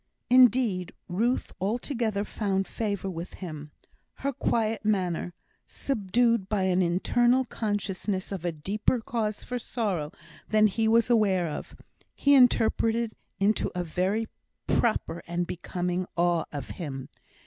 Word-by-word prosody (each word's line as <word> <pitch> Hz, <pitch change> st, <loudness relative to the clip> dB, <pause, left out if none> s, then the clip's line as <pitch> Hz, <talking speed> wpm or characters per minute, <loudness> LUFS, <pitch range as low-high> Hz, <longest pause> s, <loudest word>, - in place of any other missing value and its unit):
Indeed, 240 Hz, -8 st, +4 dB
Ruth 225 Hz, +8 st, 0 dB
altogether 220 Hz, 0 st, -1 dB
found 195 Hz, -3 st, -1 dB
favour 205 Hz, -4 st, -3 dB
with 175 Hz, -1 st, -6 dB
him. 155 Hz, -5 st, -7 dB, 0.5 s
Her 280 Hz, +1 st, -2 dB
quiet 225 Hz, -2 st, 0 dB
manner, 180 Hz, -4 st, 0 dB, 0.3 s
subdued 230 Hz, -3 st, +1 dB
by 205 Hz, -3 st, +1 dB
an 185 Hz, 0 st, +2 dB
internal 240 Hz, +9 st, +3 dB
consciousness 205 Hz, -4 st, -2 dB
of 190 Hz, -4 st, -4 dB
a 175 Hz, -, 0 dB
deeper 200 Hz, +10 st, 0 dB
cause 220 Hz, -2 st, -2 dB
for 250 Hz, 0 st, -3 dB
sorrow 195 Hz, -12 st, -2 dB, 0.4 s
than 215 Hz, 0 st, +4 dB
he 220 Hz, +2 st, +1 dB
was 230 Hz, +2 st, +4 dB
aware 195 Hz, -6 st, +3 dB
of, 155 Hz, -, -6 dB, 0.4 s
he 285 Hz, -, +4 dB
interpreted 230 Hz, -3 st, +3 dB, 0.3 s
into 205 Hz, +2 st, +2 dB
a 180 Hz, -, -1 dB
very 185 Hz, +7 st, 0 dB, 0.4 s
proper 215 Hz, -7 st, 0 dB
and 175 Hz, +1 st, -1 dB
becoming 180 Hz, +1 st, -3 dB
awe 175 Hz, -1 st, +2 dB
of 145 Hz, -3 st, -6 dB
him. 135 Hz, -6 st, -6 dB
200 Hz, 125 wpm, -27 LUFS, 180-230 Hz, 0.5 s, Indeed